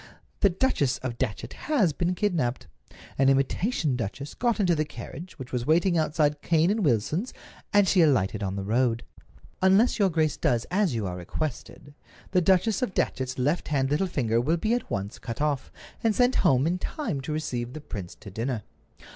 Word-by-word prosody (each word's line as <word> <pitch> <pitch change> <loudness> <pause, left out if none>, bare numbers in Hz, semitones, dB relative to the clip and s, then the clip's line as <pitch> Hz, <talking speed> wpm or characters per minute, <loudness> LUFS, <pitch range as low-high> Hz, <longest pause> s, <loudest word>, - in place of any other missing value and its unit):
The 200 - +5
Duchess 175 - +1
of 120 -3 -4
Datchet 115 +3 -3 0.2
has 215 - +3
been 175 +4 -1
kidnaped. 170 -11 0 0.5
An 135 0 +5
imitation 140 - +1
duchess 125 +5 -5
got 235 -4 0
into 180 -4 +3
the 155 -1 +1
carriage, 165 +3 -9
which 130 -3 -9
was 125 -1 -2
waiting 170 +3 +3
outside 150 -2 +1
Cane 165 +3 +3
and 215 0 0
Wilson's, 150 - 0 0.4
and 205 -1 +4
she 185 - +4
alighted 110 - +2
on 95 -1 -2
the 100 - -3
road. 115 +2 +1 0.6
Unless 195 +6 +4
your 200 -2 +4
grace 155 -3 +1
does 120 -2 +1
as 185 - +2
you 110 -3 -1
are 90 -1 -4
requested, 140 - -5 0.4
the 185 -2 +3
Duchess 190 +4 +3
of 250 -7 -2
Datchet's 130 -1 -1
left 145 +7 0
hand 135 -2 0
little 160 +6 +2
finger 115 -8 +1
will 160 +7 +1
be 215 +7 0
at 245 -1 -2
once 100 +1 -4
cut 115 - -6
off, 145 -3 -1 0.3
and 225 -2 +2
sent 250 +1 +3
home 135 -6 +3
in 175 +3 0
time 195 - -3
to 140 - -5
receive 125 -6 -3
the 155 - -6
prince 100 - -7
to 100 - -10
dinner. 115 +2 -3
150 Hz, 190 wpm, -26 LUFS, 125-185 Hz, 0.6 s, The